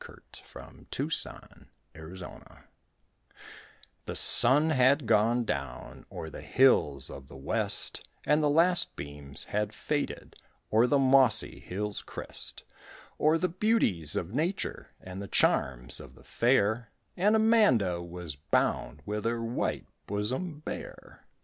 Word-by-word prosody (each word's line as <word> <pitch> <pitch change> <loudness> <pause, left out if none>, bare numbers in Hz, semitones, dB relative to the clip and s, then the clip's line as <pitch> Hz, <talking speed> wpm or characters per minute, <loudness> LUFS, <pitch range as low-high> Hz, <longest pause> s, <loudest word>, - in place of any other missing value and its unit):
HER - - -15 0.3
WHITE - - -13
BOSOM - - -2 0.3
BARE 85 +3 -12 1.4
The - - -6
sun 145 +6 +7
had 135 0 +3
gone 115 +2 +2
down 70 - -6
O'er 80 - -7
the - - -9
hills 75 - +2
of 65 - -11
the 70 - -13
west, 65 - -3 0.2
And 150 +1 +2
the 150 - +2
last 170 +4 +2
beams 70 0 -7
had 105 0 -3
faded 150 -1 -4 0.4
O'er 115 +3 +4
the 145 - +2
mossy 130 -4 +3
hill's 105 +2 -4
crest, - - -6 0.6
O'er 155 +2 +3
the 185 - 0
beauties 175 - +1
of 90 +4 -4
nature 165 +8 -3
And 90 +1 -9
the 100 - -7
charms 60 -7 +1
of - - -13
the - - -19
fair, 115 -2 0 0.3
And 205 +4 +2
Amanda 205 - +3
was 85 -3 -8
bound 75 0 -2
With 105 +1 -4
her 115 0 -1
white 115 +2 -3 0.2
bosom 130 - -3
bare. - - -9
115 Hz, 130 wpm, -28 LUFS, 85-145 Hz, 1.4 s, sun